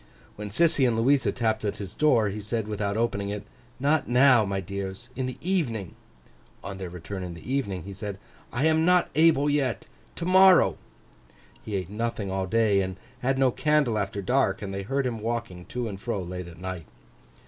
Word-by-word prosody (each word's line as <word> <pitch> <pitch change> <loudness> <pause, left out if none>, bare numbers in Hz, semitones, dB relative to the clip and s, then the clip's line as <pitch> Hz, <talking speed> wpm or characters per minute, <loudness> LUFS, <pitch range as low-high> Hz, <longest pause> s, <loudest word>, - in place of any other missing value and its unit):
When 105 0 -6
Sissy 140 - +3
and 115 -2 +1
Louisa 130 +4 +3
tapped 115 -4 -1
at 105 - -2
his 100 -2 -6
door, 120 -9 +3
he 105 +2 -5
said, 110 +1 -2
without 105 -1 -2
opening 100 -3 -1
it, 105 0 -4 0.4
'Not 145 +4 +2
now, 125 -1 +6
my 100 0 -2
dears; 100 +5 -6
in 130 -1 -2
the 130 - -6
evening.' 130 - -1 0.7
On 95 -1 -6
their 95 -2 -5
return 90 +3 -7
in 90 -2 -6
the 105 +10 -6
evening, 100 -11 -1
he 100 - -8
said, 100 0 -5 0.3
'I 130 +5 0
am 160 0 +3
not 180 +1 +3
able 155 -2 +4
yet—to 145 +3 -3
morrow.' 185 - +6 0.8
He 105 - -4
ate 95 -1 -3
nothing 110 -2 -3
all 95 0 -1
day, 105 -1 +3
and 95 -1 -3 0.2
had 135 +1 0
no 135 -1 +4
candle 150 -6 +2
after 100 0 -3
dark; 115 -3 +1
and 100 -1 -5
they 100 - -3
heard 135 +7 -1
him 120 -3 -2
walking 115 -5 -4
to 125 -1 -4
and 100 -2 -7
fro 115 -3 -2
late 90 0 -6
at 85 -1 -12
night. 90 -3 -6
110 Hz, 190 wpm, -26 LUFS, 95-130 Hz, 0.8 s, now